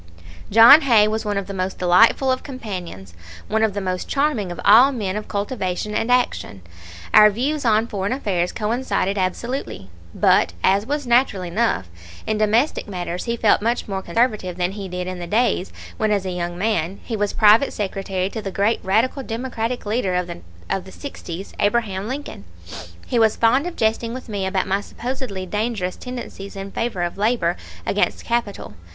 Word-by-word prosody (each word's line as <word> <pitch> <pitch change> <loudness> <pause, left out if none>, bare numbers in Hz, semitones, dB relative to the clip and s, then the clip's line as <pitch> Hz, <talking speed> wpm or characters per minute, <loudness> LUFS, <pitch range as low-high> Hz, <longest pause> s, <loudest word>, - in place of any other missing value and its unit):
John 230 +8 +9
Hay 230 -7 +5
was 220 +1 -2
one 205 -1 -1
of 200 - -2
the 200 - -7
most 185 0 -3
delightful 220 +9 +4
of 255 - -1
companions, 185 - -7 0.3
one 220 +1 0
of 220 -3 +1
the - - -1
most 185 -1 -3
charming 275 -10 0
of 175 - -7
all 240 +7 +7
men 205 -7 -3
of 210 - -5
cultivation 200 -1 -3
and 225 +3 0
action. 245 - 0 0.5
Our 210 0 +9
views 275 +7 -2
on 220 -1 +3
foreign 200 -3 -3
affairs 190 -9 -1
coincided 220 -3 -1
absolutely; 185 - -3 0.2
but, 85 - +3
as 200 +3 +2
was 290 0 -2
natural 240 -5 +2
enough, 180 - 0 0.4
in 215 -1 -1
domestic 225 +8 +1
matters 180 -2 -4
he 235 0 -2
felt 220 -3 +3
much 235 +3 -1
more 195 -2 -3
conservative 190 -2 0
than 180 0 0
he 200 -1 -6
did 180 0 -4
in 185 0 -5
the 175 - -6
days 210 -2 +1 0.3
when 220 -1 +1
as 200 -2 0
a 185 - -2
young 175 -1 -4
man 190 -3 -1
he 230 - -4
was 205 -1 0
private 220 +5 +5
secretary 195 -2 -3
to 220 - -5
the 200 - -4
great 200 +4 +1
radical 225 +8 +1
democratic 240 -1 -4
leader 205 -3 0
of 180 0 0
the 175 -1 -8 0.5
'60's, 195 -9 -8
Abraham 205 -2 0
Lincoln. 265 - -6 0.6
He 240 - 0
was 220 -1 +4
fond 255 +8 +3
of 355 - -6
jesting 225 +1 0
with 255 - -8
me 200 -3 -2
about 190 -1 0
my 195 +1 0
supposedly 240 -4 -5
dangerous 210 -2 -2
tendencies 240 -6 -8
in 195 0 -7
favor 225 -6 -2
of 175 +3 -4
labor 205 -6 +1 0.3
against - - 0
capital. 235 -4 -2
210 Hz, 180 wpm, -21 LUFS, 190-235 Hz, 0.6 s, John